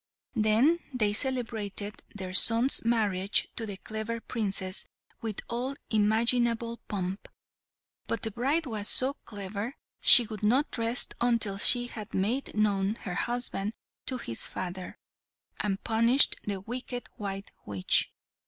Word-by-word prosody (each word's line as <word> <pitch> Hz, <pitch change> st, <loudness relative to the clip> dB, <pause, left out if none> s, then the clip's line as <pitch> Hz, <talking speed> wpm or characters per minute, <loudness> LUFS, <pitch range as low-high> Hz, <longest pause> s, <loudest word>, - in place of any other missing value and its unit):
Then 230 Hz, +9 st, +2 dB
they 215 Hz, -5 st, 0 dB
celebrated 220 Hz, -5 st, -2 dB
their 185 Hz, -2 st, -7 dB
son's 230 Hz, +7 st, +6 dB
marriage 205 Hz, -4 st, 0 dB
to 225 Hz, -, -3 dB
the 200 Hz, -2 st, -7 dB
clever 220 Hz, +3 st, -6 dB
Princess 195 Hz, -5 st, -2 dB, 0.4 s
with 220 Hz, -3 st, -5 dB
all 250 Hz, +4 st, -3 dB, 0.2 s
imaginable 230 Hz, +2 st, 0 dB
pomp; 190 Hz, -1 st, -5 dB, 0.8 s
but 230 Hz, -, -3 dB
the 220 Hz, -, -3 dB
bride 275 Hz, +9 st, -1 dB
was 215 Hz, -5 st, -3 dB
so 260 Hz, +2 st, +7 dB
clever, 205 Hz, +4 st, -7 dB, 0.2 s
she 240 Hz, -, +9 dB
would 215 Hz, -2 st, -9 dB
not 245 Hz, +5 st, 0 dB
rest 230 Hz, +2 st, 0 dB
until 230 Hz, -5 st, 0 dB
she 245 Hz, +3 st, +5 dB
had 220 Hz, -3 st, -9 dB
made 225 Hz, +8 st, -2 dB
known 205 Hz, -1 st, 0 dB
her 185 Hz, -5 st, -8 dB
husband 225 Hz, -1 st, -2 dB, 0.3 s
to 255 Hz, -, 0 dB
his 115 Hz, -, -3 dB
father, 185 Hz, 0 st, -7 dB, 0.6 s
and 200 Hz, -1 st, -3 dB
punished 230 Hz, +4 st, +5 dB
the 200 Hz, -2 st, -3 dB
wicked 245 Hz, +3 st, -7 dB
white 195 Hz, -1 st, -7 dB, 0.2 s
witch. 100 Hz, -3 st, +2 dB
220 Hz, 130 wpm, -27 LUFS, 200-240 Hz, 0.8 s, she